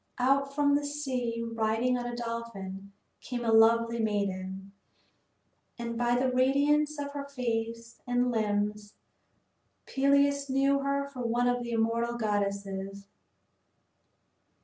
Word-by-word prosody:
Out 275 +2 +2
from 285 -1 +3
the 290 +1 +2
sea, 255 -5 -2
riding 230 +2 0
on 245 -1 -3
a 240 - -4
dolphin, 225 -5 -6 0.3
came 240 -2 -4
a 225 - +2
lovely 230 +1 +4
maiden. 195 -3 -2 1.1
And 235 -1 -4
by 240 +1 +1
the 255 +1 +1
radiance 290 +4 +2
of 285 -1 -4
her 280 -1 -5
face 230 -3 -4
and 245 0 +1
limbs 210 -1 -1 0.9
Peleus 280 0 +2
knew 275 +1 +3
her 280 0 -1
for 270 -3 -8
one 240 +1 +1
of 245 0 +1
the 240 - -5
immortal 230 +1 0
goddesses. 200 -2 -2
235 Hz, 125 wpm, -29 LUFS, 220-275 Hz, 1.1 s, lovely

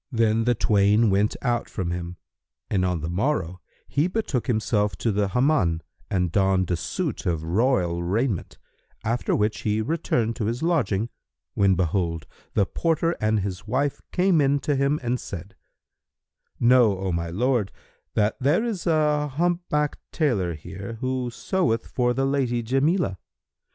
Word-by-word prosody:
Then 115 -2 +2
the 120 0 +3
twain 105 0 +3
went 100 +2 +2
out 120 -2 0
from 90 -3 -3
him, 85 0 -5 0.5
and 95 -3 +2
on 90 -3 0
the 80 - -3
morrow 90 - -1 0.3
he 145 +4 +1
betook 185 - -2
himself 105 -4 +1
to 115 - -1
the 100 0 +1
Hammam 110 - +2 0.3
and 90 -3 0
donned 95 -1 +2
a - - +3
suit 85 - -3
of 80 -3 0
royal 90 -2 +1
raiment, 100 +3 -1 0.5
after 115 +2 0
which 105 +1 0
he 105 0 0
returned 115 -4 0
to 110 - -1
his 120 +6 -2
lodging, 120 - +1 0.4
when 100 -1 +3
behold, 85 -2 -1 0.3
the 100 - +4
porter 165 - 0
and 110 -1 +2
his 95 +1 -5
wife 135 +5 0
came 180 -3 +3
in 140 0 +3
to 145 +1 0
him 140 +2 +1
and 125 +1 0
said, 95 +1 -8 1.0
"Know, 120 -4 +5
O 95 0 -2
my 85 0 -2
lord, 115 +2 0 0.4
that 105 0 +2
there 145 - +2
is 215 -7 -3
a 150 -2 +2
humpbacked 155 0 0
tailor 100 - 0
here 95 +8 -8
who 130 -1 -1
seweth 140 - 0
for 120 -1 0
the 135 - +1
lady 130 -4 0
Jamilah. 135 - +1
115 Hz, 155 wpm, -25 LUFS, 95-135 Hz, 1.0 s, Know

